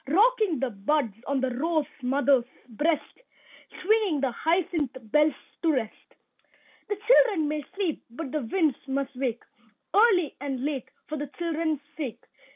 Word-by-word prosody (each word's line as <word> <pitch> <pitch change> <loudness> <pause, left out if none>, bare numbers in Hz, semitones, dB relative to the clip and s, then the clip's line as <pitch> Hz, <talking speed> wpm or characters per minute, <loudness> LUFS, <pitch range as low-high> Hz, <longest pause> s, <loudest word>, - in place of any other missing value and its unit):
Rocking 420 - +3
the 265 -1 -1
buds 230 +3 0
on 275 -1 0
the 260 -1 0
rose 310 +4 0 0.2
mother's 265 -1 +3 0.2
breast, 295 - -1 0.6
Swinging 410 -6 +3
the 270 -2 +1
hyacinth 320 -2 0
bells 300 +2 +4 0.3
to 330 - +3
rest. 230 -5 -4 0.7
The 415 - 0
children 430 -10 +5
may 300 0 -2
sleep, 380 -6 -1
but 265 +3 -6
the 305 - -1
winds 305 +3 +1
must 270 0 -2
wake 250 -3 -2 0.5
Early 390 - +4
and 270 -2 -3
late, 285 -4 -3 0.2
for 305 - -4
the 290 - -3
children's 320 -1 -2 0.2
sake. 275 -8 -5
300 Hz, 145 wpm, -27 LUFS, 265-335 Hz, 0.7 s, children